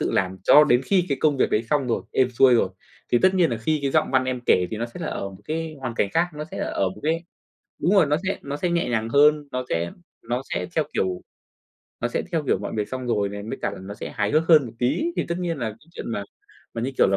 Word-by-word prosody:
tự - - 0
làm 95 0 0
cho 150 +8 +7
đến 125 -2 +3
khi 185 0 +2
cái 140 - -1
công 150 -2 +3
việc - - +2
đấy 105 - +2
xong 145 -3 +2
rồi, 120 - 0
êm 130 -1 +2
xuôi 125 0 +5
rồi. 105 - +3 0.4
Thì 120 - +6
tất 190 0 +5
nhiên 175 -5 +3
là 115 - -1
khi 155 +7 0
cái 135 - 0
giọng - - +2
văn 130 -1 +3
em 130 -1 -2
kể 90 -1 +4
thì 110 - -3
nó 115 - -2
sẽ 120 - -11
là - - -3
ở 100 - -3
một 95 - -14
cái 160 0 -4
hoàn 125 -3 -4
cảnh 100 - +1
khác, 170 +2 +3
nó 150 +1 -5
sẽ - - -6
là - - -1
ở 95 - 0
một 95 - -10
cái 165 +3 0 0.6
đúng 175 +7 +3
rồi, 190 - +6
nó 150 +1 +1
sẽ 195 - 0
nó 140 +1 -5
sẽ 180 +3 -1
nhẹ 170 -6 0
nhàng 115 -1 -1
hơn, 150 +2 +4
nó 130 0 -2
sẽ 85 +1 -1 0.4
nó 125 +2 0
sẽ - - -1
theo 155 - +3
kiểu 90 -1 -1 0.8
nó 120 - 0
sẽ - - -2
theo 160 -2 +1
kiểu - - +2
mọi - - -5
việc 105 - -1
xong 130 -1 -5
rồi 105 -4 +1
này, 100 0 -6
mới 115 +5 -5
cả - - 0
là - - -8
nó 100 +2 -7
sẽ - - -7
hài 105 -1 0
hước 155 +2 +2
hơn 150 -6 +6
một - - -9
tí. 125 - +1
Thì - - 0
tất 170 +1 -2
nhiên 170 -3 -2
là 115 -4 -2
cái 125 +10 -17
chuyện - - -6
mà 100 - -2 0.5
mà 115 - -3
như 135 - -1
kiểu - - +6
là 95 - +2
130 Hz, 295 wpm, -24 LUFS, 110-155 Hz, 0.8 s, cho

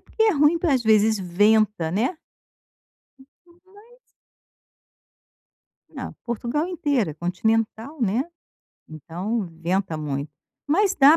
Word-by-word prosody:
porque 445 - -2
é 440 -1 +5
ruim 300 +3 +4
porque, 325 -5 +2
às 250 - +1
vezes, 220 0 +4
venta, 205 -1 +2
né. 240 - -1 1.5
Mas 415 +6 -19 2.0
Ah, - - -5
Portugal 240 +7 -2
inteira 285 - 0
é - - -9
continental, 220 - -1
né, 225 +4 +1 0.7
então, 180 +8 -4 0.2
venta 180 -1 0
muito. 145 -1 -4 0.4
Mas, 385 +6 +2
dá 290 +1 +7
225 Hz, 110 wpm, -23 LUFS, 185-295 Hz, 2.0 s, dá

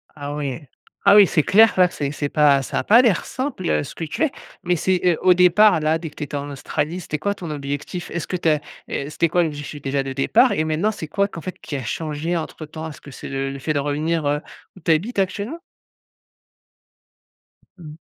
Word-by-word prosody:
Ah 145 -1 -5
oui. 140 -1 -4 0.4
Ah 200 0 +7
oui, 205 -1 +9
c'est 155 -3 +1
clair 220 +6 +6
là 180 -1 +6
que - - -13
c'est 140 -1 -2
c'est 145 0 -3
pas 145 -2 +4
ça 135 - -2
a - - -2
pas 230 +4 +6
l'air 225 -9 +2
simple, 260 -9 -3
heu, 75 0 +1
ce - - -9
que 165 - -5
tu 160 - -2
es. 310 - +2 0.3
Mais 180 0 +1
c'est, 185 +2 +1
heu, 175 -3 +4
au 185 -1 +6
départ, 180 +1 +5
là, 155 +1 +1
dès 165 -1 -6
que - - -22
tu - - -5
étais 145 0 -6
en 145 0 -4
Australie, 150 +4 -3
c'était 155 -3 -4
quoi, 200 +7 -1
ton 180 -5 -8
objectif? 145 +4 -5
Est 175 - -2
ce 165 - -6
que 185 - -3
tu 170 -2 +1
as 150 -1 +3 0.3
heu, 140 - -3
c'était 165 +2 0
quoi 175 +2 +3
l'objectif, 145 -2 -5
déjà, 135 0 -1
de 135 - -5
départ 135 +1 +3
et 155 - +1
maintenant, 160 +7 0
c'est 165 -7 -7
quoi 200 +6 +1
qu'en 170 - -8
fait 185 - -6
qui 150 - -6
a 130 - -5
changé 155 +6 -3
entre-temps? 160 0 -6
Est - - -8
ce - - -15
que 140 - -12
c'est - - -9
le 135 0 -2
le 140 - -7
fait 155 +4 -1
de 145 - 0
revenir, 150 +3 -1
heu, 145 +1 0 0.3
où - - -13
tu 165 - +1
habites 200 +8 0
actuellement? 205 - -2 2.2
Mmh. 155 -3 -11
160 Hz, 245 wpm, -21 LUFS, 145-180 Hz, 2.2 s, oui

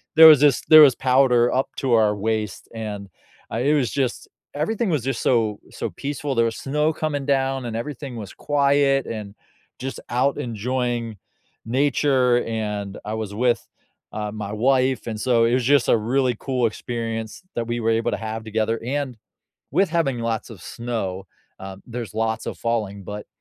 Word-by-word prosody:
there 160 0 +11
was 155 -4 +9
this 145 -3 +4
there 155 -1 +10
was 135 -5 +7
powder 125 -2 +3
up 130 +1 0
to 135 - -1
our 105 -2 +4
waist 110 -1 -3
and, 105 -3 -6 0.4
uh, - - -2
it 140 +5 +2
was 135 -5 +1
just 130 -4 -2 0.3
everything 195 +8 -1
was 150 -8 0
just 135 -3 -2
so 110 -4 +1
so - - -4
peaceful, 145 0 -4
there 115 0 +3
was 115 - -2
snow 150 +3 0
coming 145 -3 -2
down 135 -2 0
and 115 - -4
everything 130 +2 -5
was 105 -4 -7
quiet 140 -2 +2
and 105 -2 -6 0.4
just 135 +1 -5
out 130 +3 +1
enjoying 120 -1 -2 0.5
nature 130 0 +2
and 105 -3 -3
I 105 - -3
was 110 -2 -4
with, 120 0 +1 0.5
uh, 105 -1 -3
my 105 -1 -5
wife 130 +2 +1
and 110 -2 -4
so 120 -1 +3
it 120 - +2
was 130 -1 +2
just 140 -1 +3
a - - +5
really 125 +2 +1
cool 130 -3 0
experience 115 +1 -5
that 115 -1 -2
we 120 0 -2
were 115 - +1
able 115 0 +1
to - - -1
have 110 0 -5
together, 110 +1 -1
and, 135 -2 -2 0.5
with 195 -2 +2
having 155 -7 0
lots 115 0 -3
of 105 - -11
snow, 100 -6 -4 0.3
um, 95 0 -8
there's 120 -2 -6
lots 110 0 -1
of - - -5
falling, 105 -4 -2
but 105 +2 -7
120 Hz, 180 wpm, -23 LUFS, 110-135 Hz, 0.5 s, there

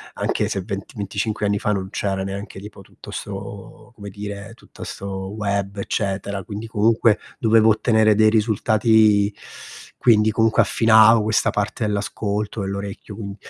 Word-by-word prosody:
anche - - -1
se 95 - -2
vent 100 +4 -6
25 105 +2 -3
anni 100 0 0
fa 105 - -1
non 95 -2 -2
c'era 95 -2 -2
neanche 100 0 -7
tipo 100 0 -11
tutto - - -15
'sto 100 +3 -8
come 100 -1 -9
dire, 100 +1 -7
tutta - - -13
'sto 95 -1 -6
web 100 -2 -3
eccetera, 100 -1 -3
quindi 105 +5 -7
comunque 110 0 +2 0.2
dovevo 110 -1 +4
ottenere 110 -1 +3
dei 110 +1 +5
risultati 110 -1 +3 0.7
quindi 110 -2 +4
comunque 110 +1 +3
affinavo 110 0 +5
questa 110 +1 +1
parte 105 +2 -2
dell'ascolto, 105 +1 -3
dell'orecchio, 100 +1 -6
quin 100 -2 -7
105 Hz, 140 wpm, -21 LUFS, 100-110 Hz, 0.7 s, dei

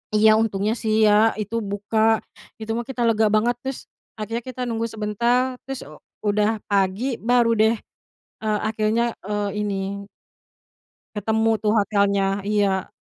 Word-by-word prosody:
Iya, 215 +1 +6
untungnya 210 -1 0
sih 220 0 +2
ya 215 +2 +4
itu 210 +3 -5
buka, 215 +2 +1 0.4
itu 220 0 -5
mah 235 +1 -2
kita 255 -2 -5
lega 220 -1 +3
banget 215 +3 +2
terus, 265 +1 -5 0.4
akhirnya 225 +2 -3
kita 255 0 -7
nunggu 230 -1 -2
sebentar, 235 +4 0
terus, 270 -1 -5
eee, 150 +1 -13 0.3
udah 210 +1 +2 0.2
pagi 200 +6 0
baru 240 0 +3
deh, 220 +2 +4 0.7
eee, 215 -1 0
akhirnya, 220 +2 0 0.2
eee, 210 0 -2
ini 205 -2 -1 1.4
ketemu 220 +2 +1
tuh 210 -1 +2
hotelnya, 200 -1 +1
iya. 200 -3 0
215 Hz, 140 wpm, -23 LUFS, 205-230 Hz, 1.4 s, Iya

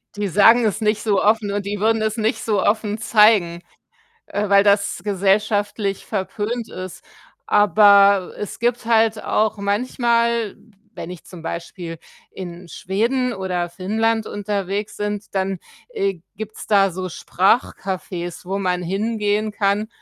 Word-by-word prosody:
Die 205 -1 -2
sagen 225 +5 +5
es 215 +1 -1
nicht 210 0 0
so 205 -4 +2
offen 210 -1 +2
und 205 0 -3
die 205 0 -3
würden 225 +1 +2
es 220 +1 -1
nicht 220 +3 -1
so 210 -4 +1
offen 210 0 0
zeigen, 210 -6 +3 0.7
äh, 205 0 -2
weil 200 0 +5
das 200 -3 +2
gesellschaftlich 205 0 0
verpönt 210 +3 -3
ist. 185 -1 -8 0.4
Aber 200 -1 +5
es 210 - -6
gibt 240 0 0
halt 225 -1 +2
auch 215 0 0
manchmal, 235 +1 0 0.4
wenn 170 - -7
ich 180 -3 -10
zum 175 -3 -12
Beispiel 165 0 -6 0.3
in 175 -1 -9
Schweden 235 +9 -1
oder 180 -3 -2
Finnland 220 +5 -1
unterwegs 205 0 -3
sind, 205 -1 -4
dann, 190 0 -1 0.3
äh, 195 - -2 0.2
gibt's 215 +1 -8
da 195 -2 +4
so 185 +1 -5
Sprachcafés, 185 -2 -1
wo 195 +2 -3
man 180 -2 -1
hingehen 210 +2 -1
kann, 205 +1 0
205 Hz, 140 wpm, -21 LUFS, 190-220 Hz, 0.7 s, sagen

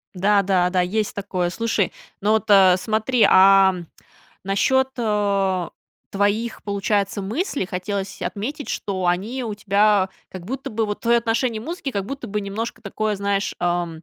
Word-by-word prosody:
Да, 200 +2 +3
да, 185 -2 +2
да, 180 0 +1
есть 210 +4 -1
такое. 185 -3 -2
Слушай, 220 -1 -1 0.3
ну, 205 +2 +2
вот, 220 -2 +1
э, 190 -3 +7
смотри, 220 +4 +1
а, 195 0 +6 0.7
насчет, 265 +7 +2
э, 200 -5 0 0.4
твоих, 205 +3 -1
получается, 200 0 -1
мыслей 235 - -2
хотелось 195 +1 -4
отметить, 275 +9 -4
что 185 -3 -2
они 210 +9 -1
у 220 -3 -4
тебя, 205 -1 +2 0.2
как 185 -2 -9
будто 265 +5 -5
бы, 220 +1 -1
вот 205 -1 -5
твое 235 0 +3
отношение 230 0 -1
музыки, 305 +1 -5
как 200 -4 -3
будто 270 +1 -6
бы 210 0 -2
немножко 205 +4 -5
такое, 215 0 -2
знаешь, 200 0 -1
а, 175 0 0
205 Hz, 155 wpm, -22 LUFS, 190-225 Hz, 0.7 s, э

